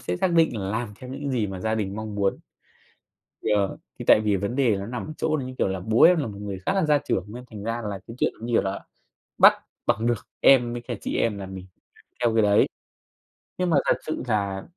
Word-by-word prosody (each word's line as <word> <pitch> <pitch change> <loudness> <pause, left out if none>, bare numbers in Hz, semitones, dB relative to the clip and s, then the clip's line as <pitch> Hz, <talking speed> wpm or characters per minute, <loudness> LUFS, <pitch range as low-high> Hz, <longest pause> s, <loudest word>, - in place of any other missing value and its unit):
sẽ 90 - -3
xác 180 - +1
định 165 -8 +3
là 95 -1 -3
làm 115 +2 -2
theo 125 - -9
những 140 +1 -4
gì 120 -5 0
mà 95 -2 -6
gia 110 +3 0
đình 100 -2 -3
mong 110 -1 -5
muốn. 100 -1 0 1.1
Yeah, 100 -2 +2 0.3
thì - - -6
tại - - +8
vì 105 -2 +2
vấn 100 +7 -3
đề 130 -4 +3
là - - -4
nó 100 - -5
nằm 120 +5 -5
ở 155 - -6
chỗ - - -1 0.2
như 130 0 -7
kiểu - - +2
là 95 -1 -3
bố 110 +5 +2
em 175 +1 +7
là 150 - -1
một 100 -3 -7
người 100 -2 -5
khá - - +2
là 190 -4 +2
gia 150 -1 +4
trưởng, 95 - -2
nên 125 - -8
thành 105 -3 -8
ra 115 +2 -2
là 100 - -4
cái 115 - -9
chuyện - - +1
như 120 - -4
kiểu - - +4
là 95 0 -3 0.6
bắt - - +8 0.3
bằng 110 - +1
được 120 -2 -1
em 120 -3 +5
với 120 - -4
cả 120 - -5
chị - - -3
em 110 -3 +1
là 95 - -6
mình 95 -1 -8 0.3
phải - - -22 0.2
theo 115 - +3
cái 115 - +5
đấy. 105 -1 +4 0.9
Nhưng 180 -1 0
mà 160 - +4
thật - - +3
sự 155 - -3
là 100 -4 -1
110 Hz, 260 wpm, -25 LUFS, 100-125 Hz, 1.1 s, tại